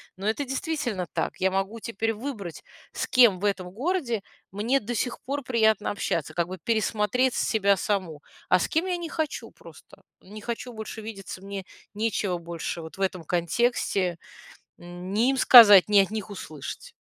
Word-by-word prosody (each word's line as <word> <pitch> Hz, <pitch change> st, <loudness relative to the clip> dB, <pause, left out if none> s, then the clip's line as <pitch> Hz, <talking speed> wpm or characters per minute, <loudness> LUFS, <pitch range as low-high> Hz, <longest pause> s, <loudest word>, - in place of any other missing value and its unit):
но 195 Hz, +2 st, -8 dB
это 280 Hz, +6 st, -1 dB
действительно 265 Hz, -, -3 dB
так, -, -, -2 dB
я 190 Hz, 0 st, +3 dB
могу 195 Hz, +4 st, -2 dB
теперь 225 Hz, 0 st, -2 dB
выбрать, 210 Hz, -, -7 dB, 0.3 s
с -, -, -2 dB
кем 235 Hz, -8 st, +5 dB
в 205 Hz, -, -3 dB
этом 185 Hz, -3 st, -1 dB
городе 255 Hz, -, -1 dB, 0.3 s
мне 230 Hz, +7 st, +1 dB
до 235 Hz, +3 st, -5 dB
сих 245 Hz, +2 st, -2 dB
пор 285 Hz, +2 st, -3 dB
приятно 220 Hz, -4 st, +2 dB
общаться, 165 Hz, -6 st, -2 dB
как 170 Hz, 0 st, 0 dB
бы 185 Hz, +1 st, -7 dB
пересмотреть 220 Hz, +5 st, +1 dB
себя 200 Hz, -3 st, +2 dB
саму, 185 Hz, -8 st, -2 dB, 0.3 s
а 180 Hz, -, +4 dB
с -, -, -1 dB
кем 325 Hz, +4 st, +1 dB
я 365 Hz, -1 st, -1 dB
не 340 Hz, -2 st, -5 dB
хочу 310 Hz, -2 st, -3 dB
просто. -, -, -16 dB, 0.2 s
Не 210 Hz, +3 st, -11 dB
хочу 240 Hz, +2 st, -5 dB
больше 220 Hz, 0 st, -7 dB
видеться, 195 Hz, -3 st, -8 dB
мне 195 Hz, -1 st, -6 dB, 0.3 s
нечего 205 Hz, -4 st, -1 dB
больше 170 Hz, 0 st, -5 dB
вот 160 Hz, +3 st, -10 dB
в -, -, -8 dB
этом 185 Hz, -4 st, -1 dB
контексте, 180 Hz, 0 st, 0 dB, 0.6 s
м, 175 Hz, +2 st, -8 dB
ни 235 Hz, +5 st, +3 dB
им 270 Hz, -, +1 dB
сказать, 210 Hz, -8 st, +9 dB
ни 205 Hz, -1 st, +5 dB
от 195 Hz, +1 st, +2 dB
них 215 Hz, -1 st, -4 dB
услышать. 155 Hz, -7 st, -8 dB
210 Hz, 175 wpm, -26 LUFS, 185-240 Hz, 0.6 s, сказать